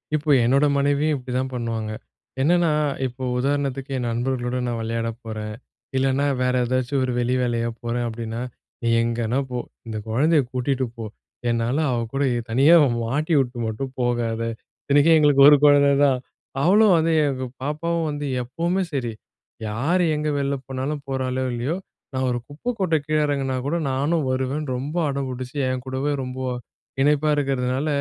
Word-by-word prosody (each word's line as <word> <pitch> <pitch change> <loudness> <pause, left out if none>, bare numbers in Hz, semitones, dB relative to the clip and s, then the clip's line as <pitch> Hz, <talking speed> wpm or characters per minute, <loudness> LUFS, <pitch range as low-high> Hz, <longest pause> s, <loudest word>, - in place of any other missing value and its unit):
இப்போ 150 0 -2
என்னோட 135 +5 +4
மனைவியும் 145 +2 +2
இப்டிதான் 130 +1 -3
பண்ணுவாங்க. 115 -3 -3 0.5
என்னென்னா 170 +2 +3 0.4
இப்போ 130 +1 -9
உதாரணத்துக்கு 140 0 -1
என் 120 -1 -2
நண்பர்களோடு 125 +1 -1
நான் 120 -1 -2
வெளையாடப் 115 +1 -3
போறன். 110 -1 -5 0.4
இல்லன்னா 135 +1 +2 0.2
வேற 125 0 +2
ஏதாச்சும் 130 +2 0
ஒரு 125 - -1
வெளி 125 +1 +1
வேலையா 120 -1 0
போறேன் 120 0 -2
அப்படின்னா, 115 +1 -5 0.4
"நீ 115 - -1 0.2
எங்கனா 120 +2 0
போ. 125 - -2 0.3
இந்த 110 -1 -4
குழந்தைய 150 +6 +3
கூட்டிகிட்டு 130 +1 0
போ 115 - -5 0.5
என்னால 115 +4 0
அவள 120 -2 0
கூட 140 +1 0 0.3
தனியா 140 +8 +6 0.3
மாட்டி 150 +8 -1
உட்டு 125 -1 -5
மட்டும் 130 +5 -4
போகாத." 120 -2 0 0.4
இத்தனைக்கும் 145 +3 +5
எங்களுக்கு 145 -2 +5
ஒரு 145 - +7
கொழந்த 145 -1 +6 0.2
தான் 130 -2 +2 0.4
அவளும் 200 +3 +5
வந்து 165 +1 +2 0.2
எங்க 130 -2 -2 0.2
பாப்பாவும் 165 +3 -1
வந்து 145 0 -4 0.2
எப்புமே 170 +9 -1
செரி 120 -5 -2 0.5
யார் 145 +13 +1
எங்க 150 0 -2
வெளில 140 0 0
போனாலும் 135 +3 -3
போறாளோ 130 -1 -1
இல்லையோ, 125 +8 -1 0.4
நான் 130 0 0
ஒரு 120 0 -1
குப்பை 150 +12 -6
கொட்ட 175 -4 +2
கீழே 155 0 +1
எறங்குனா 135 -2 -1
கூட 170 +4 0
"நானும் 145 +3 0
வருவேன்னு" 130 +2 -2
ரொம்ப 145 +7 -4
அடம் 140 -1 -2
புடிச்சு 130 +2 -6
என்கூடவே 130 +3 -2
ரொம்ப 125 +1 -6 0.6
இணைப்பா 150 +1 +3
இருக்கறதுனால, 135 0 0
130 Hz, 150 wpm, -23 LUFS, 120-145 Hz, 0.6 s, ஒரு